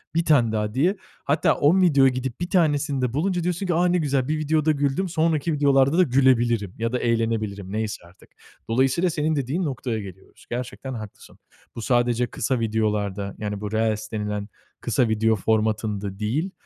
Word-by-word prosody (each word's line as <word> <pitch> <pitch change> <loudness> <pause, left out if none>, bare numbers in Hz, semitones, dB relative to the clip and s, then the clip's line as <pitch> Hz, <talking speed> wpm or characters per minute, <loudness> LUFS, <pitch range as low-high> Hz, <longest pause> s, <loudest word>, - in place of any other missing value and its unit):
1 165 0 +1
tane 130 -8 +4
daha 105 -1 -2
diye. 175 +10 +2 0.3
Hatta 145 +3 +2
10 170 +7 +3
videoya 140 -7 +5
gidip 130 +1 -4
1 175 - -2
tanesinde 145 -7 +1
bulunca 180 +4 0
diyorsun 180 +2 -2
ki, 175 - +1
"A, 175 +2 +2
ne 180 0 +2
güzel 140 -5 0
bir 155 - 0
videoda 155 0 +1
güldüm 145 +6 0
sonraki 160 -1 0
videolarda 140 +1 +3
da 185 - +6
gülebilirim 120 - +2
ya 115 +1 -2
da 125 - -1
eğlenebilirim." 110 -4 -1
neyse 110 -4 -3
artık. 85 - -21 0.4
Dolayısıyla 135 +9 +2
senin 155 0 0
dediğin 140 +7 -1
noktaya 125 -5 -3
geliyoruz. 95 -2 -12
Gerçekten 125 +2 -5
haklısın. 110 -4 -10 0.4
Bu 115 - -5
sadece 120 0 +1
kısa 120 +3 -2
videolarda 105 -3 -1
yani 105 -1 -4
bu 105 -1 -4
reels 110 -1 -1
denilen 105 -1 -3 0.3
kısa 125 - +1
video 110 0 +2
formatında 105 -2 -1
değil, 140 - -1
125 Hz, 170 wpm, -24 LUFS, 110-150 Hz, 0.4 s, da